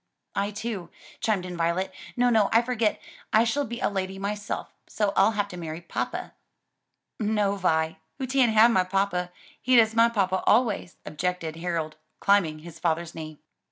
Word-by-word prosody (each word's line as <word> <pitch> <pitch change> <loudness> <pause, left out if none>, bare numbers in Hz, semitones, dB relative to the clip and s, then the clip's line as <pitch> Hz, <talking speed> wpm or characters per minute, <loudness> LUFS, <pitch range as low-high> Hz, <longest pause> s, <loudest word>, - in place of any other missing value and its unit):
"I 200 +1 0
too," 210 -3 -5 0.3
chimed 205 -5 0
in 180 -1 -6
Violet. 170 +3 0 0.2
"No, 245 0 +4
no, 220 -3 +4
I 230 +1 +5
forget, 235 -3 0 0.3
I 220 - +5
shall 280 +5 0
be 235 0 -6
a - - +2
lady 190 -1 -3
myself: 205 +1 -4
so 205 -2 0
I'll 195 +3 +4
have 205 -1 0
to 180 - -8
marry 160 -1 -5
papa." 175 - -4 0.9
"No, 210 -2 +1
Vi, 160 -4 +1 0.2
oo 265 - -1
tan't 260 -2 +3
have 225 +2 +7
my 185 -5 +3
papa; 185 -1 -1 0.3
he's 255 -1 +4
dus' 220 -1 +4
my 230 +1 +5
papa 190 -4 0
always," 215 -6 +2
objected 165 +1 -3
Harold, 165 -3 -3 0.2
climbing 190 -6 +3
his 165 -2 -10
father's 170 0 -1
knee. 155 -2 -8
195 Hz, 170 wpm, -26 LUFS, 175-220 Hz, 0.9 s, have